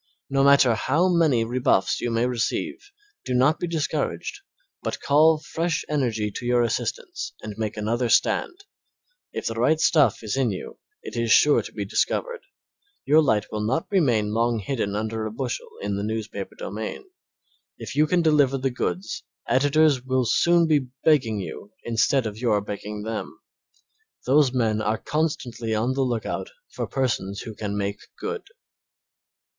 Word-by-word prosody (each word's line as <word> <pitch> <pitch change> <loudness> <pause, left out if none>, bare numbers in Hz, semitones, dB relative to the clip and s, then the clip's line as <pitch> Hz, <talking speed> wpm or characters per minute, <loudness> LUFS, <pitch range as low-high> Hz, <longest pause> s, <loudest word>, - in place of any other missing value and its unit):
No 135 0 +3
matter 140 -3 +6
how 160 - +1
many 160 -9 +3
rebuffs 120 -5 +1
you 120 - -1
may 115 +1 +1
receive, 320 - -2 0.3
be 125 - -2
not 130 +5 +3
discouraged 170 - -2 0.4
but - - -3
call 155 +3 +4
fresh 160 +2 -2
energy 115 -8 -1
to - - -7
your 120 0 +3
assistance 115 - -3
and 105 -1 -6
make 110 -1 -3
another 115 +3 0
stand. 365 - +1 0.7
If - - -5
the 115 - -1
right 125 +8 +2
stuff 150 -7 +3
is 110 +1 -2
in 135 -3 +1
you 95 - -6 0.2
it - - -8
is 115 -1 0
sure 150 +6 +6
to - - -9
be - - -4
discovered; 485 -1 -1 0.7
your 155 +3 +5
light 110 -8 +2
will 105 - -3
not 130 +9 0
remain 120 - +2
long 115 +1 +1
hidden 105 -2 -2
under 110 +1 -2
a - - -6
bushel 125 +2 -4
in 100 -1 -1
the 100 - -3
newspaper 110 -2 -4
domain. 110 - -6 0.7
If - - -7
you 155 +1 +4
can 175 +1 +2
deliver 145 -4 +3
the 135 0 -1
goods 95 -4 -3 0.3
editors 145 0 +3
will 130 -1 +1
soon 170 +9 +4
be 150 -5 +2 0.2
begging 125 -9 +3
you 100 +2 -8
instead 120 +3 +2
of 110 0 -5
your 115 -4 +2
begging 105 +1 -6
them. 110 0 -5 0.9
Those 135 0 +4
men 110 -4 +1
are 110 +1 0
constantly 125 -8 -2
on 120 +4 0
the 135 - -1
lookout 120 -4 -2 0.2
for - - -4
persons 100 -7 -1
who 110 - -7
can 105 -1 -4
make 100 0 -2 0.2
good. 445 0 -4
125 Hz, 160 wpm, -24 LUFS, 110-150 Hz, 0.9 s, matter